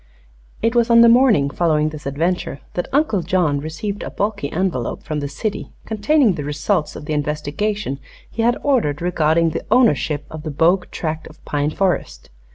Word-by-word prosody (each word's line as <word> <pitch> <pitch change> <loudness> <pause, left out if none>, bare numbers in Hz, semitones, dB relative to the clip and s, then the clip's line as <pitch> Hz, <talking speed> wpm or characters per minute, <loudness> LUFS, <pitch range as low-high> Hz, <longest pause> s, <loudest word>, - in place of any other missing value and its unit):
It 230 0 +2
was 240 -1 +2
on 235 0 +7
the 235 - +8
morning 230 - +4
following 155 -2 +1
this 150 -2 -8
adventure 165 +1 -1
that 175 - -2
Uncle 275 - +2
John 170 -4 +1
received 160 +8 -5
a - - -5
bulky 200 -8 -2
envelope 165 -9 -2
from 155 -1 -3
the 145 - -3
city 200 +9 -4
containing 220 +2 +2
the 155 -4 -5
result 150 +3 -1
of - - -8
the 155 - -3
investigation 150 +4 -2 0.3
he 230 - -4
had 240 +1 +2
ordered 230 - +1
regarding 165 -1 +2
the 165 - -4
ownership 150 - +2
of 155 - -7
the 155 - -5
Bogue 170 +5 +2
tract 160 -1 -4
of 155 - -17
pine 145 0 0
forest. 185 - -2
165 Hz, 175 wpm, -20 LUFS, 150-210 Hz, 0.3 s, the